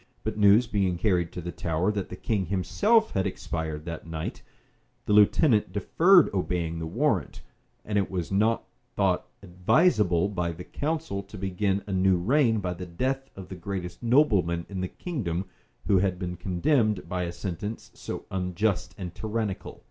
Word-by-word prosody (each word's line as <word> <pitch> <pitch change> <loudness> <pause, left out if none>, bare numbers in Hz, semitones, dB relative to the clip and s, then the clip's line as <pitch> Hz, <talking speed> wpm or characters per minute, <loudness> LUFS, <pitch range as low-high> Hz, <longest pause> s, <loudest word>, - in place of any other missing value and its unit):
But - - -2
news 105 +3 +6
being 95 -5 0
carried 90 -4 +1
to 90 - -5
the 85 +1 -5
Tower 85 +5 0
that 100 -3 -3
the - - -6
king 100 -2 -1
himself 210 - +2
had 95 +1 0
expired 80 -4 -4
that 85 -1 -6
night, 80 -1 -5 0.6
the 105 - +1
lieutenant 105 - +4
deferred 165 - +5
obeying 85 -3 -1
the 80 - -4
warrant; - - -1 0.4
and 105 -1 +1
it 95 - -1
was 90 -2 -3
not 110 +4 +2 0.3
thought - - +1 0.2
advisable 95 - +3
by 90 -4 -2
the 85 +2 -8
council 150 - -3
to 100 +1 -12
begin 95 +1 -1
a 100 - -4
new 95 0 +3
reign 115 +3 +2
by 90 -2 -2
the 90 +1 -7
death 130 +10 -2
of 95 -2 -9
the 95 - -6
greatest 90 -1 -5
nobleman 105 - +3
in 95 -2 -4
the 95 - -1
kingdom, 95 - -3 0.4
who 95 - +4
had 95 -1 0
been 90 -1 -4
condemned 100 - +1
by 90 0 -2
a 85 -1 -2
sentence 100 +5 -5
so - - -7
unjust 95 +2 -1
and 90 -3 -6
tyrannical. 110 -1 -4
95 Hz, 170 wpm, -27 LUFS, 90-110 Hz, 0.6 s, news